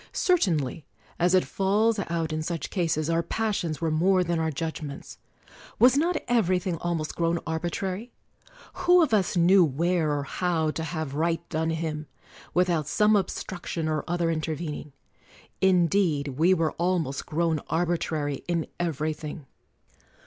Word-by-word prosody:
Certainly, 165 - +1 0.4
as 175 +2 +4
it 185 - +3
falls 210 +3 +1
out 165 -2 -1
in 155 - -1
such 165 -1 -4
cases, 160 -4 0
our 165 0 +2
pas 215 +5 -1
sions 160 -2 -3
were 165 -1 0
more 180 +4 +3
than 170 -1 -1
our 160 0 0
judgments. 155 -1 -6 0.6
Was 245 +3 +6
not 330 +4 +2
everything 185 -6 +1
almost 165 -2 -3
grown 170 0 +1
arbitrary? 185 +7 -3 0.6
Who 360 -1 +4
of 290 - 0
us 190 -3 +2
knew 180 +2 +6
where 165 +2 +1
or 145 -1 -1
how 160 +1 0
to 160 - -4
have 160 -3 -4
right 165 +2 -1
done 160 -1 -1
him, 155 -2 -3 0.4
with 180 +1 +2
out 160 -5 0
some 210 +5 +3
obstruction 175 -3 -2
or 155 -1 -1
other 170 -1 0
intervening? 155 -2 -4 0.7
In 185 -2 +5
deed 160 -6 +1
we 160 +8 +3
were 165 -2 +1
almost 170 -6 -1
grown 160 0 0
arbitrary 160 -4 -1
in 170 -2 0
every 155 -2 -1
thing. 150 -1 -8
170 Hz, 150 wpm, -26 LUFS, 155-185 Hz, 0.7 s, Was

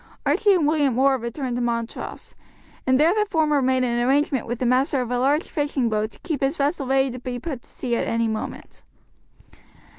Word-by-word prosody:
Archie 410 -2 +4
and 335 -5 +2
William 290 -5 +2
Orr 270 +1 +4
returned 240 +2 -4
to - - -1
Montrose, 235 -1 -4 0.5
and 260 0 +4
there 325 +4 +5
the 425 0 +1
former 305 -4 +2
made 260 0 +2
an 240 -1 0
arrangement 270 0 +1
with 240 +1 -3
the 250 - -2
master 260 +3 +2
of 245 - -7
a 245 - 0
large 285 +5 +2
fishing 285 -6 -1
boat 215 0 0
to - - -17
keep 320 -6 -3
his 275 +4 0
vessel 280 -1 0
ready 265 0 +2
to 250 - -7
put 250 +2 -5
to - - -21
sea 240 -2 -3
at - - -1
any 230 0 +1
moment. 220 -1 -6
260 Hz, 205 wpm, -23 LUFS, 240-290 Hz, 0.5 s, there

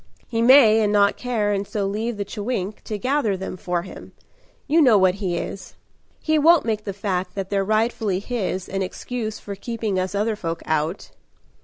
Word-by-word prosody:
"He 230 -1 -1
may 230 -3 +7
and 210 -1 +2
not 200 -1 +4
care 225 -5 -1
and 200 0 -2
so 210 -4 -2
leave 215 +3 -2
the 200 - -3
chewink 205 -1 -4
To 215 - -3
gather 250 -4 0
them 190 0 -5
for 175 -2 -2
him 190 - -11 0.5
you 320 +3 +3
know 245 -8 +6
what 185 -1 +4
he 180 -3 -1
is. 185 +1 -6 0.4
He 315 -1 +1
won't 330 0 +5
make 215 -2 -2
the 200 - -2
fact 185 -2 -3
that 195 -1 -4
they're 200 -1 +1
rightfully 215 -1 0
his 195 -3 -3
An 195 0 -3
excuse 220 +3 -4
for 200 - -7
keeping 215 -1 -3
us 185 +2 -2
other 215 +2 0
folk 165 -4 -5
out." 155 +4 -2
205 Hz, 190 wpm, -22 LUFS, 190-230 Hz, 0.5 s, may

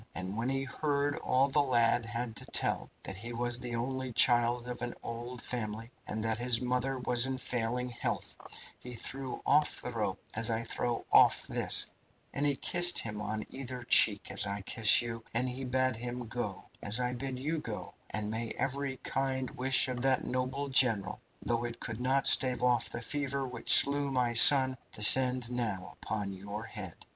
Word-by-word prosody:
And 95 +4 -4
when 115 +3 -2
he 135 0 -2
heard 145 +1 -2
all 130 +2 +1
the 145 +1 +1
lad 120 -3 +1
had 115 +1 -5
to - - -4
tell - - -1
that 95 - -7
he 120 +4 -7
was 120 0 -3
the 120 -1 -6
only 130 +2 -4
child 120 0 +3
of 125 - -7
an 120 - -5
old 120 +1 -7
family, 115 -1 -5 0.2
and 110 0 -4
that 110 0 0
his 120 -1 +2
mother 125 +1 -2
was 125 0 +2
in 130 0 -3
failing 125 0 -3
health 120 - -5 0.4
he 125 -1 -9
threw 135 +2 -5
off 150 +1 +2
the 125 - -6
rope 105 -5 -3
as 115 +1 -1
I 115 0 -2
throw 120 +1 -4
off - - +4
this, - - +2 0.5
and 145 +1 -1
he 140 - 0
kissed 175 +5 +3
him 105 -2 -2
on 110 +1 -4
either 130 -2 -8
cheek, 105 -4 +4
as - - +1
I 100 +1 -4
kiss 110 +3 +4
you, 115 -1 -7
and 125 +2 0
he 130 +1 -5
bade 130 -1 -1
him 120 +1 -6
go, 120 +2 -6 0.2
as 105 +4 +2
I 125 0 -2
bid 130 +1 -5
you 155 +5 -3
go, - - -8 0.2
and 105 0 -3
may 115 +1 -4
every 135 0 -3
kind 130 -1 -3
wish 130 +1 +2
of 125 -1 -5
that 130 0 +1
noble 130 +3 -3
general, 115 -8 +2 0.2
though 120 0 -2
it 120 -1 -7
could 110 -1 -6
not 130 +2 0
stave 125 -2 +5
off 125 -1 +1
the 120 - -7
fever 140 0 -3
which 125 -2 -3
slew 140 0 +6
my 125 -3 -1
son, 130 +2 +8 0.2
descend 125 +3 +6
now 110 -7 -4
upon 100 -2 -4
your 100 +3 -8
head." 100 -7 -6
125 Hz, 190 wpm, -30 LUFS, 115-130 Hz, 0.5 s, son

